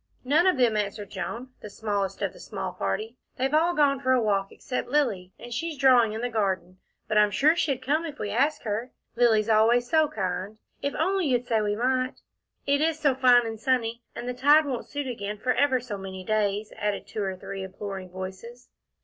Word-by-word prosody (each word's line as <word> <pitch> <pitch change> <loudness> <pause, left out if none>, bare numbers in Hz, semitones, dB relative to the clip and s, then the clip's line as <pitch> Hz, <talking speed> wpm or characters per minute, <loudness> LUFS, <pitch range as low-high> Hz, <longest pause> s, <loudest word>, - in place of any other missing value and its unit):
"None 305 +8 +3
of 370 - +3
them," 240 -4 +3
answered 205 -1 -3
Joan, 205 +8 -5
the 210 - -8
smallest 205 -2 -2
of - - -1
the - - -15
small - - -5
party. 440 +1 -3 0.2
"They've 265 +3 0
all 335 +3 +3
gone 280 -2 +3
for 260 -1 +2
a 255 - +4
walk 200 -3 0
except 250 -2 -4
Lilly, 215 -11 0
and 240 0 -9
she's 325 +4 -3
drawing 250 -5 +5
in 220 - -4
the 245 - 0
garden, 190 -4 -1 0.3
but 215 - +3
I'm 210 0 +5
sure 300 +10 +3
she'd 275 -6 -1
come 305 +5 +1
if 295 -2 -8
we 205 - -4
asked 280 +8 +1
her. 220 +3 -2 0.3
Lilly's 225 -3 +3
always 230 +2 +4
so 315 +1 +3
kind 190 -1 -4 0.2
if 280 - -2
only 375 +1 +1
you'd 250 -2 +1
say 225 -2 +1
we 205 0 0
might." 255 +3 0 0.4
"It 280 +1 +2
is 320 0 +1
so 290 -3 +2
fine 250 -2 +5
and 225 -1 -5
sunny, 235 -1 0
and 240 +1 -6
the 250 - -2
tide 290 +5 +5
won't 260 -4 -4
suit 290 -1 -4
again 210 -4 -4
for 250 +4 0
ever 275 -3 +2
so 230 -5 -6
many 190 -1 -7
days," 210 0 -1
added 205 -1 -2
two 215 - -5
or 190 -1 -2
three 195 +1 -7
imploring 190 0 -6
voices. 190 +7 -8
235 Hz, 210 wpm, -26 LUFS, 205-270 Hz, 0.4 s, drawing